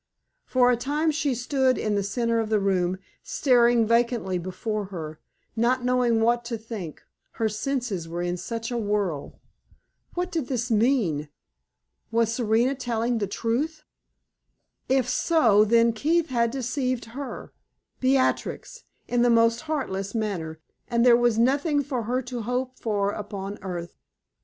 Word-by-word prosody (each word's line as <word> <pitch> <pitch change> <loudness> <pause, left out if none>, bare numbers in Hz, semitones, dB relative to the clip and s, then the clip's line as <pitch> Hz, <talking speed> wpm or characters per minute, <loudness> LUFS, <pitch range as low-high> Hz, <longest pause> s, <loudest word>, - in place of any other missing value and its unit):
For 250 -1 +4
a - - +3
time 295 +6 0
she 290 -3 0
stood 260 +1 +1
in 215 - -1
the 200 - +1
center 230 +3 0
of 220 -1 -2
the 215 -1 +3
room, 185 -2 +1 0.2
staring 240 -3 +3
vacantly 230 -5 +1
before 200 +4 -3
her, 160 -5 -7 0.4
not 245 +2 +1
knowing 250 -2 +2
what 235 +1 +2
to 235 -1 -3
think, 215 -8 -8 0.3
her 225 - 0
senses 215 -5 -3
were 175 +1 -3
in 175 0 -1
such 230 +5 -5
a 240 - -1
whirl. 205 -8 -2 0.8
What 360 +1 -2
did 320 -8 -2
this 245 -2 -2
mean? 210 - +2 0.8
Was 230 0 +1
Serena 235 +2 +2
telling 240 -2 -1
the 205 - -1
truth? 280 - -2 1.1
If 260 -2 +2
so, 245 -8 +4
then 230 +1 +4
Keith 320 +8 +1
had 235 -2 +2
deceived 255 -1 -2
her 275 +1 -7 0.5
Beatrix 265 - 0 0.2
in 245 -1 +1
the 245 - +4
most 230 0 +4
heartless 200 -9 -2
manner; 175 -8 -3 0.3
and 235 0 +2
there 245 -1 +8
was 240 -2 +2
nothing 285 +5 +2
for 255 -5 -3
her 250 +3 -1
to 245 -1 -5
hope 250 +3 -3
for 205 -3 0
upon 205 -1 -6
earth. 175 -3 -6
235 Hz, 145 wpm, -25 LUFS, 210-255 Hz, 1.1 s, there